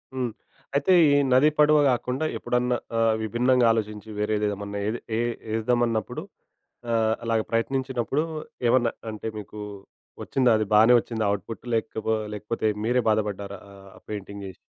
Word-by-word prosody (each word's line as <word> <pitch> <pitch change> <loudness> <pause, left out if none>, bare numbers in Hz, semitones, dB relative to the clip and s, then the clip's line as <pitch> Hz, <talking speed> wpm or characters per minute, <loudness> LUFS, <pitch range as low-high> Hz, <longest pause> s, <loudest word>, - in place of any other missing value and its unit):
హ్మ్. 125 -3 -1 0.4
అయితే, 145 +7 +3 0.2
ఈ - - +4 0.2
నది, 135 +4 +6
పడవ 150 0 +6
గాకుండా 125 +4 -1
ఎప్పుడన్నా 125 0 0 0.2
ఆహ్, 115 -1 +3
విభిన్నంగా 120 +3 +2
ఆలోచించి 105 -1 -3
వేరేదేమన్నా 105 -1 -1
ఏది 115 +3 -2 0.2
ఏ - - 0 0.3
యేద్దామన్నప్పుడు 115 -1 0 0.7
ఆహ్, 110 -1 +2
అలాగ 115 -1 +1
ప్రయత్నించినప్పుడు 130 +3 0 0.5
ఏమన్నా 120 -2 +3 0.2
అంటే, 110 +1 -6
మీకూ 105 0 -8 0.6
ఒచ్చిందా 125 -3 +2
అది 110 - 0
బానే 110 +3 +7
ఒచ్చిందా 110 -2 -3
ఔట్‌పుట్, 110 +3 -9
లేకపో 110 0 -1 0.2
లేకపోతే 105 +2 -2 0.2
మీరే 125 +1 +2
బాధపడ్డారా 100 -2 -1
ఆహ్, 100 0 -14
ఆ - - -15
పెయింటింగ్ 100 -1 -6
చేసి? 95 - -10
115 Hz, 135 wpm, -25 LUFS, 105-125 Hz, 0.7 s, బానే